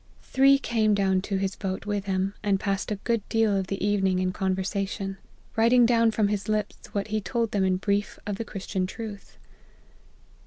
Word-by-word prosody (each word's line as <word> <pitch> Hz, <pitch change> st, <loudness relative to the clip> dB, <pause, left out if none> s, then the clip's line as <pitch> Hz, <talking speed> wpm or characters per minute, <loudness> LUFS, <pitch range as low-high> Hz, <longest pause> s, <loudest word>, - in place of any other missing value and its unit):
Three 275 Hz, +1 st, +5 dB
came 220 Hz, -5 st, +1 dB
down 190 Hz, -2 st, +2 dB
to 195 Hz, 0 st, -2 dB
his 190 Hz, 0 st, -1 dB
boat 190 Hz, -1 st, -4 dB
with 205 Hz, -1 st, -2 dB
him, 190 Hz, 0 st, 0 dB
and 200 Hz, -2 st, +1 dB
passed 195 Hz, -1 st, -1 dB
a 210 Hz, -, 0 dB
good 230 Hz, +3 st, -1 dB
deal 225 Hz, -2 st, +2 dB
of 190 Hz, -1 st, -1 dB
the 195 Hz, 0 st, -2 dB
evening 195 Hz, -2 st, +2 dB
in 185 Hz, 0 st, 0 dB
conversation; 195 Hz, +1 st, -2 dB, 0.4 s
writing 235 Hz, +2 st, +5 dB
down 230 Hz, -1 st, +4 dB
from 215 Hz, -2 st, +1 dB
his 205 Hz, 0 st, -2 dB
lips 210 Hz, -1 st, -2 dB
what 205 Hz, 0 st, -2 dB
he 215 Hz, 0 st, 0 dB
told 230 Hz, +2 st, -1 dB
them 200 Hz, -2 st, +1 dB
in 185 Hz, -1 st, +2 dB
brief 200 Hz, +1 st, -1 dB
of 205 Hz, +2 st, -3 dB
Christian 190 Hz, -1 st, -3 dB
truth." 210 Hz, 0 st, -8 dB
200 Hz, 185 wpm, -26 LUFS, 195-215 Hz, 0.4 s, Three